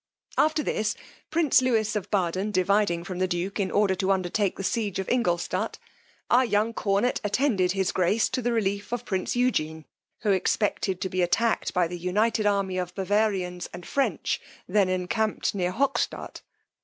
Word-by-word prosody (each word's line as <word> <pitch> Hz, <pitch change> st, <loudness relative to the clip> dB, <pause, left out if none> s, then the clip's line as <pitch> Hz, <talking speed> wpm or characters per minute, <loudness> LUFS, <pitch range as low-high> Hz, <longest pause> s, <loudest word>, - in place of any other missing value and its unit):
After 310 Hz, 0 st, +2 dB
this, 215 Hz, -5 st, -1 dB, 0.3 s
prince 315 Hz, -5 st, +4 dB
Lewis 225 Hz, -4 st, +1 dB
of 205 Hz, -1 st, -3 dB
Baden 190 Hz, 0 st, 0 dB
dividing 185 Hz, -2 st, +2 dB
from 180 Hz, 0 st, -6 dB
the 185 Hz, -, +2 dB
duke, 180 Hz, +4 st, -2 dB
in 190 Hz, -2 st, 0 dB
order 200 Hz, -1 st, +2 dB
to 190 Hz, +1 st, -1 dB
undertake 190 Hz, +1 st, 0 dB
the 195 Hz, -, -6 dB
siege 205 Hz, -1 st, -1 dB
of 190 Hz, -, -3 dB
Ingoldstadt, 180 Hz, -9 st, 0 dB, 0.5 s
our 250 Hz, +2 st, +5 dB
young 225 Hz, -1 st, +1 dB
cornet 205 Hz, +3 st, 0 dB
attended 205 Hz, -4 st, +1 dB
his 190 Hz, -1 st, 0 dB
grace 190 Hz, +5 st, +2 dB
to 255 Hz, -, -2 dB
the 240 Hz, 0 st, 0 dB
relief 205 Hz, -2 st, -1 dB
of 245 Hz, 0 st, -3 dB
prince 190 Hz, +2 st, -2 dB
Eugene, 160 Hz, -11 st, 0 dB, 0.4 s
who 210 Hz, -, +2 dB
expected 190 Hz, 0 st, 0 dB
to 190 Hz, -, -1 dB
be 185 Hz, 0 st, -1 dB
attacked 225 Hz, +6 st, +1 dB
by 180 Hz, -2 st, +2 dB
the 175 Hz, +1 st, -6 dB
united 210 Hz, +5 st, +1 dB
army 195 Hz, -2 st, 0 dB
of 180 Hz, 0 st, -4 dB
Bavarians 190 Hz, -3 st, 0 dB
and 175 Hz, -, -8 dB
French, 275 Hz, -1 st, -1 dB, 0.3 s
then 200 Hz, -3 st, +2 dB
encamped 185 Hz, +4 st, 0 dB
near 180 Hz, -3 st, 0 dB
Hockstadt. 275 Hz, +7 st, -1 dB
200 Hz, 170 wpm, -26 LUFS, 185-220 Hz, 0.5 s, our